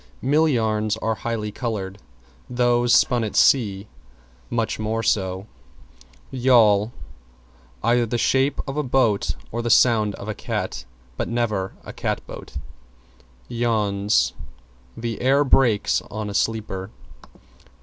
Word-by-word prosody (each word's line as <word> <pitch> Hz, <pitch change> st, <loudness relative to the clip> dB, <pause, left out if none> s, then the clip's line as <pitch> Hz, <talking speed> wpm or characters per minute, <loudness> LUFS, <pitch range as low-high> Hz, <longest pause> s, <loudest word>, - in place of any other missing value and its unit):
Mill 150 Hz, +5 st, +3 dB
yarns 110 Hz, -4 st, 0 dB
are 110 Hz, 0 st, -1 dB
highly 110 Hz, -1 st, -4 dB
colored; 105 Hz, -4 st, -4 dB, 0.5 s
those 120 Hz, -1 st, +2 dB
spun 120 Hz, -2 st, +4 dB
at 110 Hz, -, -4 dB
sea 100 Hz, -7 st, +3 dB, 0.6 s
much 115 Hz, -2 st, -1 dB
more 110 Hz, +1 st, -2 dB
so. 95 Hz, -2 st, 0 dB, 0.9 s
=YAWL= 115 Hz, -5 st, +4 dB, 0.9 s
Either 120 Hz, +1 st, +2 dB
the 120 Hz, -, -1 dB
shape 135 Hz, +4 st, +1 dB
of 135 Hz, +1 st, -4 dB
a -, -, +2 dB
boat 125 Hz, -6 st, +1 dB, 0.2 s
or 120 Hz, -, -2 dB
the 120 Hz, -, -2 dB
sound 110 Hz, -3 st, +4 dB
of 100 Hz, -, -9 dB
a 110 Hz, -, -2 dB
cat, 65 Hz, -, -4 dB, 0.3 s
but -, -, -2 dB
never 110 Hz, -5 st, -1 dB
a -, -, -9 dB
cat -, -, -3 dB
boat. -, -, -10 dB, 0.9 s
=YAWNS= 105 Hz, -, +1 dB, 0.6 s
The 115 Hz, -1 st, -4 dB
air 135 Hz, +3 st, +4 dB
breaks 125 Hz, -6 st, +3 dB
on 105 Hz, -1 st, -5 dB
a -, -, -7 dB
sleeper. 105 Hz, -3 st, -2 dB
115 Hz, 125 wpm, -23 LUFS, 105-120 Hz, 0.9 s, spun